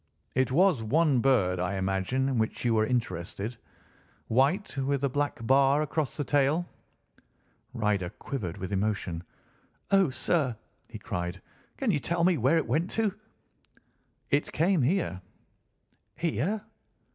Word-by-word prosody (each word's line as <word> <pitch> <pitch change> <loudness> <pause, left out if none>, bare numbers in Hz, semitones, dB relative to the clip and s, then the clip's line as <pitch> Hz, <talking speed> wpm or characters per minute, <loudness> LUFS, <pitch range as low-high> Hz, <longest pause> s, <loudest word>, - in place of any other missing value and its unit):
It 130 0 +1
was 175 -2 +4
one 140 +4 +3
bird, 105 -9 +2
I 90 +2 -1
imagine 95 +7 0
in 130 -4 0
which 110 +2 -2
you 120 - +3
were 110 -1 +2
interested—white, 125 - -3
with 140 +1 0
a 140 - +2
black 145 -3 -2
bar 140 +3 +4
across 150 -1 -2
the 145 - 0
tail." 145 +5 +2 1.1
Ryder 105 -6 0
quivered 100 - -5
with 95 +1 -5
emotion. 95 -4 -1 0.7
"Oh, 195 -4 +5
sir," 130 -3 0 0.3
he - - -7
cried, 90 +1 -4 0.4
"can 260 -5 +1
you 150 - +1
tell 170 +7 -1
me 180 0 +4
where 135 +8 +3
it 160 - +1
went 165 +4 0
to?" 220 -3 +2 1.2
"It 145 +1 +1
came 175 +1 +2
here." 130 - 0 0.9
"Here?" 175 - -1
135 Hz, 135 wpm, -28 LUFS, 110-160 Hz, 1.2 s, Oh